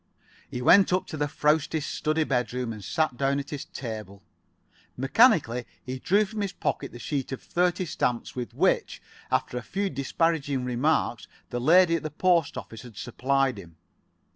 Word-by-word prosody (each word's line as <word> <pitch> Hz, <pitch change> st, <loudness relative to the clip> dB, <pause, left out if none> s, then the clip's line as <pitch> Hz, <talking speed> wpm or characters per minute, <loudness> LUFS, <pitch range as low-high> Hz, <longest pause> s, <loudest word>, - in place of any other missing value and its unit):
He 125 Hz, -, -5 dB
went 195 Hz, +7 st, +6 dB
up 185 Hz, +1 st, +1 dB
to -, -, -5 dB
the 145 Hz, -1 st, 0 dB
frowsty 150 Hz, +2 st, +1 dB
study 155 Hz, +1 st, -1 dB
bedroom, 125 Hz, -3 st, -1 dB
and 105 Hz, -2 st, -9 dB
sat 155 Hz, +9 st, 0 dB
[Pg 125 Hz, -, -18 dB, 0.2 s
53]down -, -, 0 dB
at 140 Hz, -, -6 dB
his 145 Hz, -2 st, -5 dB
table. 110 Hz, -5 st, -7 dB, 0.7 s
Mechanically 135 Hz, -, +3 dB, 0.2 s
he 130 Hz, 0 st, -5 dB
drew 205 Hz, +9 st, +3 dB
from 215 Hz, +1 st, -5 dB
his 195 Hz, -1 st, -2 dB
pocket 140 Hz, -5 st, -3 dB
the -, -, -10 dB
sheet 135 Hz, +2 st, -3 dB
of 135 Hz, -, -4 dB
thirty 180 Hz, +1 st, 0 dB
stamps 125 Hz, -6 st, -2 dB
with 125 Hz, -2 st, -5 dB
which, -, -, +1 dB, 0.3 s
after 125 Hz, -, 0 dB
a -, -, -8 dB
few 195 Hz, +9 st, -2 dB
disparaging 140 Hz, -1 st, 0 dB
remarks, 125 Hz, -1 st, 0 dB, 0.2 s
the 120 Hz, -, -2 dB
lady 170 Hz, +5 st, +5 dB
at -, -, -6 dB
the 155 Hz, -, -4 dB
post 170 Hz, 0 st, +2 dB
office 110 Hz, -1 st, -8 dB
had 120 Hz, -5 st, -13 dB
supplied 130 Hz, 0 st, 0 dB
him. 85 Hz, -4 st, -13 dB
140 Hz, 175 wpm, -27 LUFS, 125-165 Hz, 0.7 s, went